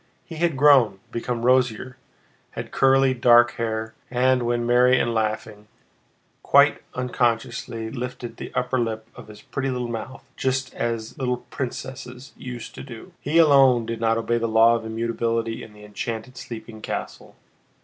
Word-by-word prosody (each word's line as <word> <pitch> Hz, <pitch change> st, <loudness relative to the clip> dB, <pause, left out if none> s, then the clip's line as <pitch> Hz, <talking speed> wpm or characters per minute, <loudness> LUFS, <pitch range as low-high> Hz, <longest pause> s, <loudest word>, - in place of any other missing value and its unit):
He 165 Hz, -, -9 dB
had 165 Hz, -3 st, 0 dB
grown, 130 Hz, -8 st, +5 dB
become 115 Hz, 0 st, -3 dB
rosier, 125 Hz, -1 st, +2 dB, 0.6 s
had -, -, -6 dB
curly 135 Hz, 0 st, +4 dB
dark 120 Hz, -1 st, +5 dB
hair, 110 Hz, -1 st, -3 dB, 0.2 s
and, 130 Hz, +1 st, +2 dB
when 120 Hz, 0 st, 0 dB
merry 125 Hz, +1 st, +4 dB
and 120 Hz, -, 0 dB
laughing, 110 Hz, -1 st, -3 dB, 0.7 s
quite -, -, +4 dB
unconsciously 120 Hz, -2 st, -2 dB
lifted 125 Hz, -2 st, -6 dB
the -, -, -7 dB
upper 125 Hz, +1 st, 0 dB
lip 110 Hz, -1 st, -3 dB
of -, -, -12 dB
his 105 Hz, -1 st, -13 dB
pretty 135 Hz, -1 st, -3 dB
little 125 Hz, -1 st, -2 dB
mouth 120 Hz, +3 st, -6 dB
just 130 Hz, 0 st, -1 dB
as 115 Hz, -1 st, -3 dB
the -, -, -11 dB
little 125 Hz, -1 st, -2 dB
princess 130 Hz, +1 st, -6 dB
used 125 Hz, -2 st, -8 dB
to -, -, -9 dB
do. 120 Hz, -4 st, -10 dB
He 155 Hz, +3 st, 0 dB
alone 135 Hz, -7 st, +6 dB
did 115 Hz, 0 st, -5 dB
not 115 Hz, 0 st, +2 dB
obey 120 Hz, +1 st, 0 dB
the 115 Hz, -, -1 dB
law 115 Hz, +1 st, +5 dB
of 115 Hz, -1 st, -2 dB
immutability 115 Hz, 0 st, -2 dB
in 110 Hz, -, -11 dB
the 105 Hz, 0 st, -14 dB
enchanted, 115 Hz, +3 st, -5 dB
sleeping 110 Hz, -2 st, -9 dB
castle. -, -, -6 dB
120 Hz, 160 wpm, -23 LUFS, 115-130 Hz, 0.7 s, alone